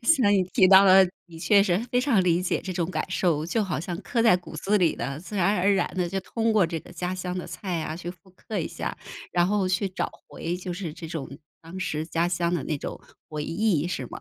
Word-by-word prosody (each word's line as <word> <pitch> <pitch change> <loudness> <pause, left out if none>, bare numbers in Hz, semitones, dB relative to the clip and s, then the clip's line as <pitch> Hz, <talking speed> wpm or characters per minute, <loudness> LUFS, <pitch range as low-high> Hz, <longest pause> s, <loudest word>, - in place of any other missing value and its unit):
像 235 -7 +4
你 195 -2 +4
提 190 - +6
到 190 +1 +8
了， 190 0 +8 0.2
你 165 -2 -12
确 200 +4 +5
实 185 -2 +2
非 245 - +2
常 250 -7 +3
理 175 0 +2
解 180 - 0
这 185 - -5
种 175 -1 -2
感 - - -1
受， 165 -5 +1
就 215 +7 0
好 180 -8 -2
像 175 +1 -4
刻 235 -4 0
在 225 -6 +6
骨 180 - -11
子 205 +1 +1
里 170 -4 +2
的， 135 +3 -4
自 205 +3 -7
然 200 +3 +2
而 195 +3 +3
然 195 - +2
地 180 -2 0
就 195 - -2
通 225 +3 -1
过 205 -5 +4
这 165 -1 -4
个 - - -14
家 180 +1 -3
乡 180 -1 -4
的 180 - -4
菜 180 -5 -4
啊， 155 - -4
去 175 0 -6
复 185 +1 -17
刻 200 +3 -6
一 165 - -1
下， - - -5 0.4
然 175 0 +3
后 200 -1 +1
去 185 +2 0
找 185 - -3 0.2
回 170 +2 -4
就 180 0 -5
是 175 -3 -5
这 165 - -8
种 160 -4 -5 0.3
当 165 +3 -9
时 155 -4 -2
家 170 0 0
乡 175 -1 0
的 175 - -2
那 150 - -2
种 - - -6 0.3
回 150 -1 -4
忆 170 -3 +1
是 135 -8 -3
吗？ - - -8
180 Hz, 275 characters per minute, -26 LUFS, 170-195 Hz, 0.4 s, 到